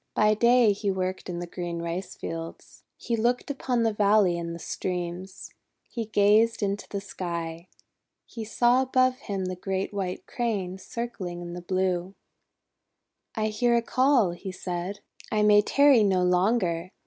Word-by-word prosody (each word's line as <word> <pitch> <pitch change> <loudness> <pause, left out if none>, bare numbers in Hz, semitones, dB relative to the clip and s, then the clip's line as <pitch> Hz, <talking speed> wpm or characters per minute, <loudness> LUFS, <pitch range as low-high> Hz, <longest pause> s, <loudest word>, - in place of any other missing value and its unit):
By 215 0 +4
day 235 0 +4
he 205 0 -2
worked 185 -1 -2
in 175 - -4
the 175 - -4
green 175 -1 -5
rice 175 +3 -4
fields. 165 0 -7 0.2
He 235 - -2
looked 240 +4 0
upon 250 -4 -1
the 225 -1 +1
valley 205 -3 +3
and 170 0 -4
the - - -6
streams. 180 +2 -5 0.4
He 230 -2 -4
gazed 215 +2 +3
into 200 0 -2
the 200 - -3
sky. 170 -3 -5 0.6
He 230 - -7
saw 240 +3 +3
above 255 -1 +2
him 195 -2 -4
the 185 0 -3
great 190 +2 -3
White 190 -2 -4
Crane 200 -6 -3
circling 195 -5 -5
in 175 0 -7
the 175 - -6
blue. 185 +1 -1 1.2
16 220 - -1
1 215 - 0
hear 235 +3 +2
a 235 - +3
call," 255 -6 +3
he 175 +2 -7
said. 185 +1 -5 0.3
'I 215 -1 +2
may 210 0 +6
tarry 280 +2 +5
no 190 -3 +2
longer! 180 -1 +1
195 Hz, 160 wpm, -26 LUFS, 180-225 Hz, 1.2 s, may